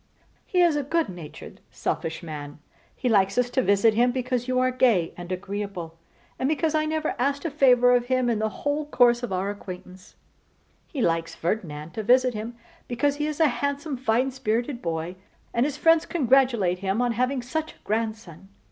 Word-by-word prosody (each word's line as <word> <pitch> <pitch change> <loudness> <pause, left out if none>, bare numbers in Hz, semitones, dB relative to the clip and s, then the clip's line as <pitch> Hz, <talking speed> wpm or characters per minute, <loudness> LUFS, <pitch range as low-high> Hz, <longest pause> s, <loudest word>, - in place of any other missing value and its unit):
He 360 - +2
is 335 -3 +4
a 295 - +1
good 320 +4 0
natured 175 -5 -10
selfish 165 +2 -3
man. 145 -3 -7 0.4
He 255 - -3
likes 200 -3 +3
us 250 0 +2
to 260 - +2
visit 200 0 +3
him 240 +3 +3
because 250 -1 -2
you 255 0 0
are 255 0 +3
gay 235 -10 +2
and 175 0 -8
agreeable, 190 -3 -5 0.4
and 260 - +1
because 315 +1 0
I 310 0 +2
never 310 0 -1
asked 280 +4 0
a 330 - -1
favour 250 -3 +5
of 245 -1 +2
him 255 -1 +1
in 230 -3 +1
the 220 0 0
whole 290 +6 -2
course 240 -4 +4
of 245 - -4
our 190 +2 -1
acquaintance: 185 -1 -10 0.7
he 270 -6 -3
likes 165 0 0
Ferdinand 165 -4 -3
to 220 - -4
visit 250 +3 +4
him 225 +2 -6 0.3
because 280 +4 0
he 295 0 -1
is 305 0 -4
a 320 - +6
handsome 280 +3 -2
fine 250 +1 +1
spirited 240 +1 -2
boy, 165 +2 -3 0.4
and 240 +4 +2
his 290 -1 -5
friends 325 +1 +4
congratulate 250 - +2
him 195 +3 -1
on 245 -1 +2
having 255 +2 0
such 315 +5 -3
a - - -26
grandson. 215 -5 -4
240 Hz, 190 wpm, -25 LUFS, 195-270 Hz, 0.7 s, a